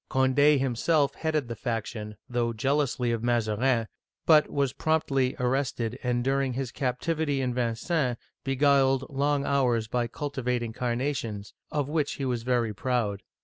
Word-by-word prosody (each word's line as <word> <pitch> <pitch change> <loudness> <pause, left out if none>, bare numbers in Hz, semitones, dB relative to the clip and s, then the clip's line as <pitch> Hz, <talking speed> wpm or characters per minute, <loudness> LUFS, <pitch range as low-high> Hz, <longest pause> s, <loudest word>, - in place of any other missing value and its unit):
Condd 140 +3 +4
himself 135 +3 +1
headed 155 -4 -1
the 115 - -5
faction, 110 -2 -4
through 120 -1 -1
jealousy 130 0 +1
of 115 -1 -1
Mazarin, 115 0 +1 0.4
but 155 -2 +6
Was 140 -2 0
promptly 140 -5 +1
arrested, 125 -1 -1
and 120 -1 0
during 135 0 +1
his 130 -1 -3
captivity 145 +3 -1
in 125 -2 0
Vincennes 125 +3 0 0.3
beguiled 135 -1 +3
long 140 +1 +1
hours 125 -5 +1
by 120 +1 0
cultivating 125 -4 -3
carnations, 120 -4 -2 0.2
of 145 -3 -1
which 150 -1 0
he 140 - -4
was 125 -3 -1
very 120 -2 0
proud. 105 -3 -1
130 Hz, 140 wpm, -27 LUFS, 120-140 Hz, 0.4 s, but